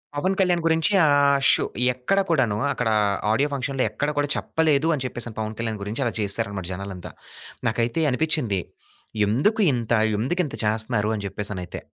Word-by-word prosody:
పవన్ 185 +7 0
కళ్యాణ్ 180 -3 +2
గురించి 165 +3 +2 0.2
ఆ - - +4 0.4
షో - - +2 0.3
ఎక్కడ 130 +11 0
కూడాను 130 -10 +2 0.2
అక్కడ 120 -2 -1 0.4
ఆడియో 140 +6 +2
ఫంక్షన్‌లో 135 -1 -1
ఎక్కడ 145 +7 -2
కూడా 145 0 +1
చెప్పలేదు 160 -1 +1
అని 135 - -4
చెప్పేసి, 120 -2 -4
పవన్ 110 0 -3
కళ్యాణ్ 110 -2 -3
గురించి 110 +7 -3
అలా 115 - -1
చేసారన్నమాట 100 -2 0
జనాలంతా. 95 -1 -7 0.6
నాకైతే 115 +6 0
అనిపిచ్చింది 125 - 0 0.7
ఎందుకు 145 - +1
ఇంత, 120 -2 -3 0.3
ఎందుకింత 150 +6 -1
చేస్తన్నారు 110 0 0
అని 105 - -5
చెప్పేసనైతే. 100 -3 -5
120 Hz, 145 wpm, -23 LUFS, 105-150 Hz, 0.7 s, ఆ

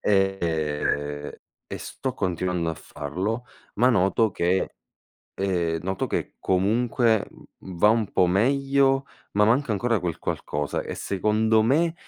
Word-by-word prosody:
ehm, 80 -7 0 0.4
e - - -5
sto 130 -1 -4
continuando 90 -3 -1
a 80 - -2
farlo, 95 +16 -4 0.3
ma 120 +5 +4
noto 110 0 +3
che 90 +2 0 0.6
ehm, 85 -4 0
noto 95 +1 -2
che - - -3
comunque 110 +4 +2 0.3
va 95 +2 +2
un 110 -2 +2
po' 90 - +4
meglio, 135 +6 +2 0.3
ma 105 +1 +4
manca 120 +2 +2
ancora 115 0 +1
quel 85 -2 -3
qualcosa. 75 0 -3
E - - -6
secondo 110 +3 +2
me, 160 +8 +2
100 Hz, 125 wpm, -25 LUFS, 90-115 Hz, 0.6 s, ma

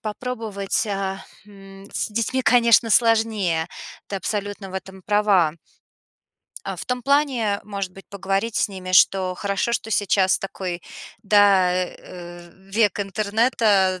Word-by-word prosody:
попробовать, 215 -2 -3
а, 195 -1 -3 0.2
м, 195 -1 -14
с - - -1
детьми, 230 +4 -1
конечно, 235 -2 +4
сложнее. 220 -7 +2 0.4
Ты 200 - -4
абсолютно 200 0 -4
в - - -11
этом 190 0 -8
права. 200 -6 +2 1.1
А, - - -4
в - - -7
том 250 0 -2
плане, 260 -7 +1
может 200 -3 -5
быть, 195 +1 -14
поговорить 195 +3 -2
с - - +2
ними, 185 -1 -7
что 185 0 +4
хорошо, 200 +5 -1
что 220 - -4
сейчас 195 -2 +2
такой, 185 -2 -5 0.4
да, 200 -3 +4
э, 175 -1 -6 0.2
век 210 -2 +1
интернета, 205 -1 +1
200 Hz, 130 wpm, -22 LUFS, 190-220 Hz, 1.1 s, конечно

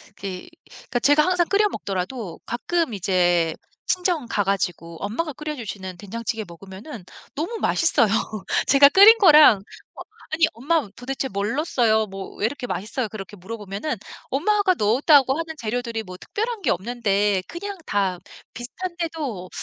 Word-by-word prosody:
그 190 -2 -7 0.2
그러니까 245 - -5
제가 290 +4 +4
항상 360 -2 +2
끓여 415 +1 +3
먹더라도 195 - -5
가끔 320 +4 -1
이제 175 -4 +1 0.3
친정 355 -7 0
가 205 - 0
가지고 175 -4 -2
엄마가 290 +10 -3
끓여 300 +2 -5
주시는 195 -7 -7
된장찌개 220 +3 -5
먹으면은 190 - -10 0.3
너무 345 +11 -3
맛있어요. 300 -8 +2 0.6
제가 280 +1 +7
끓인 405 +8 +8
거랑 305 - +8 0.4
어 - - -9 0.3
"아니 325 +1 +4
엄마 285 +4 0
도대체 265 +2 -4
뭘 205 0 -2
넣었어요? 235 -8 +2
뭐 195 -1 -9
왜 - - 0
이렇게 250 +2 -3
맛있어요?" 220 +3 -3
그렇게 205 -1 -8
물어보면은 205 - -5 0.3
엄마가 380 +6 +2
넣었다고 265 - +4
하는 325 -1 -5
재료들이 230 -1 -3
뭐 185 -3 -10
특별한 445 - -4
게 295 - 0
없는데 205 -1 0
그냥 400 +3 -6
다 195 -3 0 0.3
비슷한데도 310 - -5
235 Hz, 340 characters per minute, -23 LUFS, 200-315 Hz, 0.6 s, 끓인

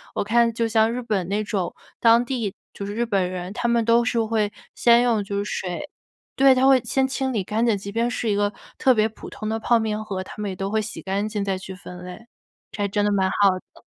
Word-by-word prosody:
我 - - 0
看 230 +3 +3
就 230 +1 0
像 220 0 +3
日 245 +1 -3
本 210 -7 -1
那 205 +3 -1
种 200 -4 -2 0.3
当 230 +1 +5
地 240 -6 -3 0.2
就 200 - -6
是 205 +1 -5
日 235 +1 0
本 195 -5 0
人， 180 0 -5
他 240 +2 -1
们 235 -1 +2
都 235 +1 +4
是 235 -1 +1
会 215 -2 0 0.2
先 235 0 +5
用 230 -4 +2
就 200 0 -4
是 - - -8
水 190 +8 -4 0.5
对， 270 0 +6
他 255 +1 +3
会 270 -1 +6
先 265 +3 +1
清 265 0 -2
理 210 -4 0
干 220 +5 0
净， 230 -3 +3
即 200 +1 -7
便 230 +3 0
是 240 -2 -2
一 205 - +2
个 205 0 +1 0.2
特 260 - +4
别 215 -1 +2
普 220 - -12
通 215 - -5
的 220 0 -1
泡 235 +1 +3
面 215 -1 -2
盒， 195 -3 -4
他 - - -11
们 205 - -2
也 - - -6
都 195 +1 -3
会 220 - +2
洗 215 - -6
干 195 +2 -1
净 210 -2 -2
再 195 -1 -1
去 190 0 -8
分 180 -1 -10
类， 180 +6 -10 0.4
这 205 - -3
还 - - +1
真 205 +1 0
的 205 - +2
蛮 190 -2 +2
好 200 +1 +4 0.2
的。 - - -20
215 Hz, 280 characters per minute, -23 LUFS, 200-235 Hz, 0.5 s, 对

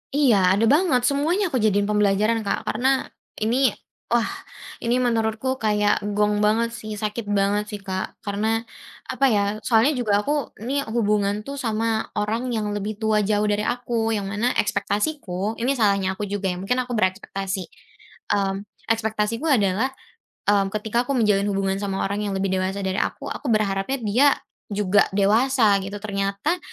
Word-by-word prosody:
Iya 270 -8 +4 0.2
ada 225 - +3
banget 300 -6 +3
semuanya 310 +8 +1
aku 255 - +1
jadiin 205 -1 +2
pembelajaran, 210 +2 +2
Kak, 200 -2 -2
karena 245 +5 +1 0.6
ini 255 +2 +3 0.4
wah 235 -1 +2 0.6
ini 240 +2 +1
menurutku 230 +3 0
kayak 210 -1 +2 0.2
gong 210 0 +2
banget 230 +2 +2
sih, 215 -1 -7
sakit 215 +1 -3
banget 205 0 +2
sih, 210 - -5
Kak. 190 0 -4
Karena 205 +1 -1 0.6
apa 275 - +1
ya, 205 - +3 0.2
soalnya 235 +6 +4
juga 215 -4 0
aku 290 - 0 0.3
ni 280 +3 0
hubungan 205 -2 +2
tuh 280 - -5
sama 225 -1 -1
orang 225 +5 -1
yang 215 - -1
lebih 205 +1 -3
tua 215 -1 +2
jauh 210 0 +2
dari 210 0 +1
aku, 235 -1 -1
yang 200 - -3
mana 235 +4 +1
ekspektasiku 205 -1 -1
ini 270 +3 +1
salahnya 195 -4 +1
aku 210 - -3
juga 195 -2 -1
ya, 180 - -3
mungkin 250 +7 0
aku 245 -2 -3
berekspektasi. 190 0 -1 0.7
Mmm, 195 0 -1 0.3
ekspektasiku 220 +4 -2
adalah, 210 -1 +2 0.6
mmm, 200 -1 +2
ketika 220 +3 -1
aku 280 - -1
menjalin 205 -2 +3
hubungan 195 -1 0
sama 195 -1 -2
orang 205 +1 -2
yang 200 - -2
lebih 190 0 -1
dewasa 190 +1 -1
dari 190 +1 -1
aku, 280 +4 -2
aku 290 - -6
berharapnya 215 +4 0
dia 225 +6 +3 0.4
juga 200 0 +3
dewasa 215 +1 +3
gitu, 200 +1 -6
ternyata, 200 - -1
210 Hz, 160 wpm, -23 LUFS, 200-235 Hz, 0.7 s, Iya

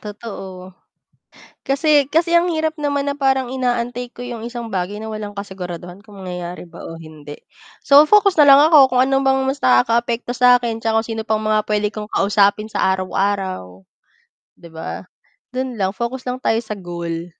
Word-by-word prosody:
Totoo, 195 -3 -9 0.9
kasi 285 +1 +3
kasi 335 +1 +3
ang 345 +1 +2
hirap 315 0 -1
naman 285 -1 -1
na 285 - -2
parang 265 -2 +1
inaantay 245 -1 -2
ko - - -14
'yung 240 -2 -6
isang 235 -1 -6
bagay 195 +1 -4
na 220 - -6
walang 215 -1 -6
kasiguraduhan, 185 -1 -8
kung 205 -2 -14
mangyayari 180 -1 -7
ba - - -12
o 165 0 -9
hindi. 150 -2 -11 0.4
So, 285 +2 +6
focus 400 +2 +4
na 300 - +7
lang 275 0 +8
ako 295 -4 +6
kung 250 - +3
ano 270 0 +1
bang 265 0 +2
mas 270 - -1
nakakaapekto 235 - +1
sa 250 0 +5
akin, 225 -1 -4
'tsaka 225 0 +2
kung 225 - -9
sino 225 -1 -3
pang 220 -1 0
mga 215 0 0
puwede 210 0 0
kong 215 0 -8
kausapin 205 +1 +2
sa - - -1
araw-araw, 185 - -3 0.7
'di 170 - -15
ba, 160 0 -7 0.5
dun 255 0 -4
lang 195 -4 -1
focus 235 +5 -5
lang 250 - -4
tayo 225 -2 0
sa 215 -2 -7
goal. 170 -2 -5
225 Hz, 180 wpm, -19 LUFS, 190-260 Hz, 0.9 s, lang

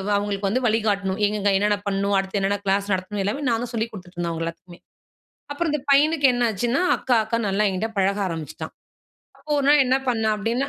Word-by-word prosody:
அவுங்களுக்கு 200 -1 -1
வந்து 250 +6 0
வழி 225 0 +2
காட்டணும். 200 -1 0
எங்கெங்க, 205 -1 0
என்னென்ன 205 +1 +1
பண்ணணும்? 200 0 0
அடுத்து 195 +1 -1
என்னென்ன 195 +1 0
கிளாஸ் 195 +1 +1
நடத்தணும்? 190 +2 -3
எல்லாமே 215 +9 -2
நான் 230 0 0
தான் 245 0 -7
சொல்லிக் 230 0 -2
குடுத்துட்டு 185 -3 -12
இருந்தேன் 170 -1 -2
அவுங்க 165 0 -3
எல்லாத்துக்குமே. 175 +1 -9 0.7
அப்பறம் 320 +2 -1
இந்த 300 - -1
பையனுக்கு 290 +1 +4
என்ன 245 0 +1
ஆச்சுன்னா, 240 - 0 0.2
அக்கா 250 - 0
அக்கானு 225 0 -1
நல்லா 195 +2 +1
என்கிட்ட 195 +4 -2
பழக 195 +1 +2
ஆரம்பிச்சுட்டான். 160 -5 -6 0.7
அப்போ, - - -24
ஒரு 280 - 0
நாள் 290 -1 +6
என்ன 255 +1 +3
பண்ணான் 220 -3 +1
அப்பிடீன்னா. 235 +6 -1
205 Hz, 200 wpm, -23 LUFS, 195-240 Hz, 0.7 s, நாள்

